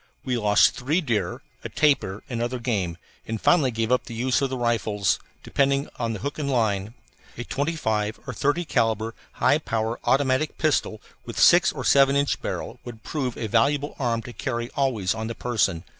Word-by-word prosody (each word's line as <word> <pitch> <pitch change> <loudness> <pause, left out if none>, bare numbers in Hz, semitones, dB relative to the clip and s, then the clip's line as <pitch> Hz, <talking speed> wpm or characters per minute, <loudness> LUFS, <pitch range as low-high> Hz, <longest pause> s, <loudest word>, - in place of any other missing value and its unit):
We 130 -2 0
lost 105 -3 +4
three 145 +7 0
deer, 110 - -2 0.2
a - - -5
tapir, 140 -10 +1
and 120 -4 -3
other 120 +2 -1
game, 100 -9 -2 0.3
and 110 0 -3
finally 150 -1 +4
gave 115 0 -2
up 125 - +2
the 115 - -8
use 125 +4 +1
of 135 - +1
the 130 - -3
rifles, 110 -5 0 0.2
depending 140 0 +1
upon 115 -2 -3
hook 145 +8 -5
and 140 -2 -2
line. 110 -4 0 0.4
A 120 - -4
25 110 -8 -1
or - - -5
30 150 +5 0
calibre 115 -4 0 0.2
high 145 +4 +3
power 115 -4 -2
automatic 135 +2 +1
pistol 145 -8 0 0.2
with - - -8
six 175 0 +6
or 130 -4 -6
seven 140 0 +5
inch 140 0 +1
barrel - - -5
would 115 -3 -10
prove 130 -4 -3
a 115 - -3
valuable 140 +7 +1
arm 115 -3 0
to 125 - -9
carry 120 -2 -3
always 120 -9 +1
on 110 0 -4
the 115 - -5
person. 105 -9 0
120 Hz, 185 wpm, -24 LUFS, 110-140 Hz, 0.4 s, six